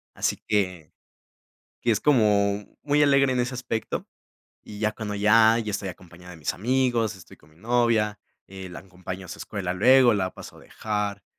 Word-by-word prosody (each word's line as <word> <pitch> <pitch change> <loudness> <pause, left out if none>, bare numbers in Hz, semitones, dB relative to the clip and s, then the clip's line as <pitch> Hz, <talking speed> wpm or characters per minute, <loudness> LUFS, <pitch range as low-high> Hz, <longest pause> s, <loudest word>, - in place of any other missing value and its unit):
Así - - 0
que 95 -6 -1 0.9
que - - +2
es - - +1
como 105 -6 +2 0.2
muy 145 0 +2
alegre 140 -2 +4
en 125 - +1
ese 120 +1 -3
aspecto, 115 -3 -4 0.6
y 105 - -11
ya 110 0 0
cuando 105 -1 -5
ya 110 +2 +5
ya 110 -3 -3
estoy 100 -1 -3
acompañado 90 0 -12
de 90 - -11
mis 75 - -3
amigos, 120 0 0
estoy 90 - -15
con 75 - -24
mi 75 - -25
novia, 115 0 +1 0.3
eh, 95 -1 -9
la 90 - -9
acompaño 90 0 -9
a - - -17
su - - -8
escuela 95 -4 -4
luego, 125 +4 +5
la 95 -2 -1
paso - - -12
a - - -15
dejar, 105 -2 -4
105 Hz, 185 wpm, -25 LUFS, 95-120 Hz, 0.9 s, ya